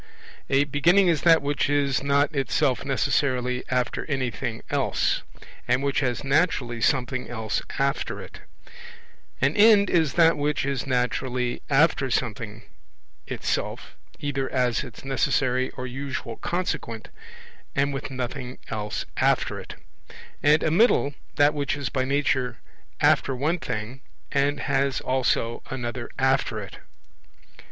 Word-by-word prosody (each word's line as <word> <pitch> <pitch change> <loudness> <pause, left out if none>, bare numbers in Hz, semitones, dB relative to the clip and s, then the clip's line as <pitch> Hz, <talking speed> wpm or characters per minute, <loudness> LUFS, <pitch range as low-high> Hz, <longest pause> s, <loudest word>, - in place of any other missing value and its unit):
A 135 +1 +4
beginning 175 +7 +4
is 165 -3 +2
that 165 -3 +5
which 145 0 0
is 140 -2 +1
not 140 +3 +2
itself 135 0 +1
necessarily 130 -2 0
after 125 -1 0
anything 125 -5 -3
else, - - +1 0.5
and 125 +2 +2
which 140 0 +1
has 125 -2 -1
naturally 135 -5 +1
something 125 -1 0
else 110 -3 -2 0.2
after 140 +1 -1
it; - - -10 1.0
an - - +2
end 210 -2 +6
is 160 -6 +2
that 165 -1 +5
which 145 -1 0
is 140 -3 -2
naturally 125 0 -1
after 140 -1 +3
something 115 -3 -2 0.6
itself, - - -3 0.2
either 135 -2 -2
as 125 -3 +1
its - - -11
necessary 130 -1 +1
or 125 - -4
usual 130 -2 -5
consequent, 170 -10 -3 0.7
and 140 +1 +1
with 135 +1 -4
nothing 130 0 -5
else 105 -1 -3
after - - +1
it; - - -9 0.7
and 150 +2 +4
a 155 - +1
middle, 170 -6 +4 0.2
that 145 +1 +4
which 145 -1 -1
is 140 - -3
by 130 -1 -1
nature 130 -3 0 0.4
after 135 - +3
one 155 +7 0
thing 110 +5 -5 0.3
and 140 +1 +1
has 135 -1 +1
also 125 -2 0
another 120 -2 -4
after 130 -4 +1
it. 100 -2 -9
135 Hz, 130 wpm, -25 LUFS, 125-145 Hz, 1.0 s, end